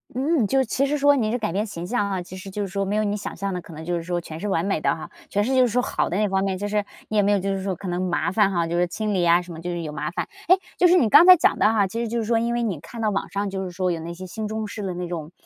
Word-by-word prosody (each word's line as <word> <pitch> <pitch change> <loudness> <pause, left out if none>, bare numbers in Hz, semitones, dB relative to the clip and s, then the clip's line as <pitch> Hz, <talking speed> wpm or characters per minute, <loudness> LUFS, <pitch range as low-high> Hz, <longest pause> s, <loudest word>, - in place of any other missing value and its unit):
嗯， 275 -3 +1
就 270 - +1
是 265 - +3
其 275 +4 0
实 295 - 0
说 285 0 +5
你 220 -4 0
是 245 - 0
改 215 -5 -2
变 200 +4 0
形 175 -4 -6
象 205 -1 0
啊， 190 - -1
其 185 - -10
实 195 +1 -8
就 205 +2 -3
是 - - -3
说， 195 +1 -2
没 195 +2 -1
有 215 - +2
你 205 0 0
想 210 - -6
象 195 0 -2
的 180 - -3
可 - - -14
能 160 +1 -8
就 175 +1 -1
是 170 - -2
说 175 +1 -2
全 160 -2 -8
是 210 - -3
完 185 -3 0
美 195 -6 0
的 - - +2
哈， 160 - -8 0.2
全 205 +1 +1
是 260 +4 0
就 260 - +5
是 250 - +5
说 245 +2 +1
好 - - -1
的 180 - -1
那 210 0 +2
方 190 0 0
面。 190 -1 -1
就 205 +2 -3
是 210 0 0 0.3
你 215 - -1
也 205 - +6
没 200 +1 +2
有 205 - +4
就 195 +1 -1
是 190 - -4
说 190 -1 -2
可 190 - -8
能 175 +1 -2
麻 180 -1 0
烦 200 -1 +3
哈， 170 -3 0
就 170 - -3
是 175 0 +2
清 215 +4 -2
理 185 -3 +1
啊 170 +1 +6
什 180 0 -9
么， 160 - -8
就 175 - -4
是 175 -1 -3
有 155 - -5
麻 150 +1 -3
烦。 - - -4 0.2
诶， 370 +2 +6 0.2
就 355 - +5
是 355 - +5
你 250 - +4
刚 345 - +8
才 365 -1 +10
讲 - - +2
的 215 - +4
哈， 210 -3 +3
其 225 +5 -4
实 235 - -2
就 235 +2 -2
是 225 - -1
说 230 +1 +2
因 235 +1 -1
为 240 - 0
你 195 -9 -2
看 195 +9 -10
到 215 -1 +1
网 200 - -2
上 200 0 -2
就 190 0 -3
是 185 - -4
说 180 +1 -1
有 165 - -2
那 165 +1 -6
些 185 +2 -8
新 215 +4 -5
中 220 0 -3
式 210 0 -7
的 185 -3 -3
那 180 0 -4
种， 165 -2 -5
200 Hz, 405 characters per minute, -23 LUFS, 180-220 Hz, 0.3 s, 才